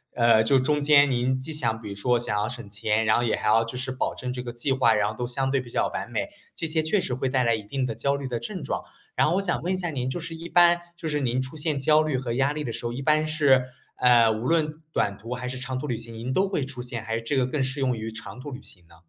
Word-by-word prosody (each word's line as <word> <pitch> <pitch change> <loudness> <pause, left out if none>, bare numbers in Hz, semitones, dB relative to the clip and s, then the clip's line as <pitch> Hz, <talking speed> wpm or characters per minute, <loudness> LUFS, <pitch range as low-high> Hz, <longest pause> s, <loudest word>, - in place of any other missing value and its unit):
呃， 115 -2 +5
就 135 - +4
中 145 +3 +1
间 145 -1 +6
您 130 +1 +1
既 140 - -5
想 115 -6 -1
比 105 - -7
如 100 - -6
说 120 +4 +2
想 105 -3 -2
要 105 - 0
省 120 -3 -7
钱， 110 +2 0
然 110 - +4
后 120 - +1
也 115 - +1
还 - - -3
要 115 +1 +5
就 125 +2 -6
是 130 0 -3
保 130 - -2
证 125 0 -4
这 125 - -4
个 120 -1 -6
计 120 +3 -2
划， 130 -4 +4
然 105 -1 +2
后 - - -5
都 120 - -2
相 135 +2 -1
对 135 - +2
比 125 - -8
较 - - +1
完 - - -5
美。 - - -2 0.3
这 165 - -3
些 160 0 +1
确 175 +6 +1
实 125 - -2
会 130 +1 -1
带 130 -1 +2
来 115 -1 +3
一 110 - -5
定 130 +6 -2
的 115 - -2
焦 140 +5 0
虑 140 - -5
的 120 -2 -3
症 190 -7 -6
状。 135 - -2 0.4
然 - - +4
后 170 - +1
我 195 - +2
想 180 -3 -1
问 180 +2 -1
一 - - +1
下 175 -2 -2
您 130 -3 -2
就 155 - -3
是 165 0 -6
一 165 +1 -8
般， 175 0 +5 0.2
就 170 - -5
是 150 - 0
您 130 -2 0
出 130 +4 -7
现 150 -1 -1
焦 150 +3 +4
虑 155 -4 0
和 125 -2 -3
压 135 +3 +2
力 150 0 -3
的 120 - -3
时 120 - -6
候， 120 - -2
一 130 - -5
般 155 +2 +2
是， 140 -5 +4 0.3
呃， 120 -3 +5
无 110 +3 -3
论 155 -1 +1
短 100 -1 0
途 115 +4 -6
还 125 0 -4
是 130 0 -5
长 130 0 -4
途 145 - -4
旅 120 - -1
行， 115 0 -7
您 120 +3 -4
都 195 +1 +2
会 190 -7 -1
出 130 -3 -7
现？ 120 -2 -5
还 110 +1 -2
是 115 - -2
这 115 +5 -2
个 130 -2 +3
更 135 +2 -2
适 135 +2 -2
用 125 -3 +1
于 110 +1 -4
长 110 +3 -9
途 145 +3 -7
旅 130 +1 -7
行 90 -3 -13
呢？ 85 - -18
130 Hz, 340 characters per minute, -25 LUFS, 115-150 Hz, 0.4 s, 间